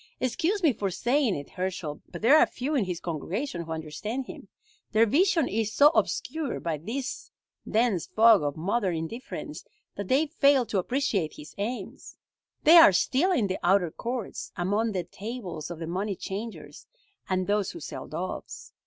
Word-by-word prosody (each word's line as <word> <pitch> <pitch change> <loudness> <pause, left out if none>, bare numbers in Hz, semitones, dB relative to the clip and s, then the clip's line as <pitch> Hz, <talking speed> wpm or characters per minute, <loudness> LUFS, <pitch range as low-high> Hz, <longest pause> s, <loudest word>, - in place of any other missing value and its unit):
Excuse 330 - 0
me 305 -6 +5
for 200 -2 -2
saying 245 +3 +1
it, 145 -1 -7
Herschel, 180 -5 -4
but - - -8
there 260 +7 +7
are - - +5
few 275 +5 -4
in 255 -9 +2
his 180 -2 -4
congregation 175 - -3
who 165 -1 -8
understand 160 - -4
him. - - -10 0.5
Their 220 +1 +5
vision 325 - +3
is 215 0 -1
so 290 +1 +8
obscured 315 -2 -1
by 160 -3 -2
this 240 - -5 0.4
dense 220 -6 +1
fog 225 -2 +6
of 145 0 -2
modern 190 +2 0
indifference 165 +11 -6 0.3
that 200 -1 -5
they 275 +7 +3
fail 280 -4 +3
to 210 -3 -1
appreciate 200 - -1
his 150 - -11
aims. 230 +5 -5 0.5
They 325 +3 +8
are 325 -11 +10
still 275 - +2
in 255 - +2
the 190 -1 -2
outer 180 -2 +3
courts, 240 +2 -5
among 205 +5 0
the 185 -2 -1
tables 195 -4 -7
of 175 - -6
the 165 - -5
money 190 +4 -2
changers, 210 +5 -7 0.4
and 185 -1 0
those 205 -1 0
who 340 - -8
sell - - -7
doves. - - -6
210 Hz, 170 wpm, -27 LUFS, 180-255 Hz, 0.5 s, are